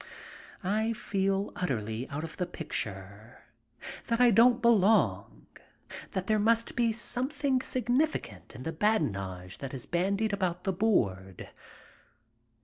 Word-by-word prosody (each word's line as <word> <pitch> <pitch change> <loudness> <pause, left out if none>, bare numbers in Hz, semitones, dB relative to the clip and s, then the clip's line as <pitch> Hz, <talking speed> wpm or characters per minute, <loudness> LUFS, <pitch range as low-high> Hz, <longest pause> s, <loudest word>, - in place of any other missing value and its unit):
I 215 +4 0
feel 195 -2 -1
utterly 115 -7 -3
out 145 +2 -4
of 165 - -7
the 180 - -2
picture, 100 -5 -6 0.6
that 230 0 0
I 245 -1 +6
don't 235 +3 +5
belong, 225 -3 +2 0.7
that 190 -1 -2
there 215 +1 +2
must 230 +2 +2
be 235 -1 +2
something 260 +4 -1
significant 250 - -1
in 125 - -8
the 160 - -3
badinage 100 - -1
that 135 -1 -6
is 125 - -7
bandied 200 +5 0
about 180 -3 -1
the 190 - 0
board. 95 - -1
195 Hz, 125 wpm, -29 LUFS, -, 0.7 s, I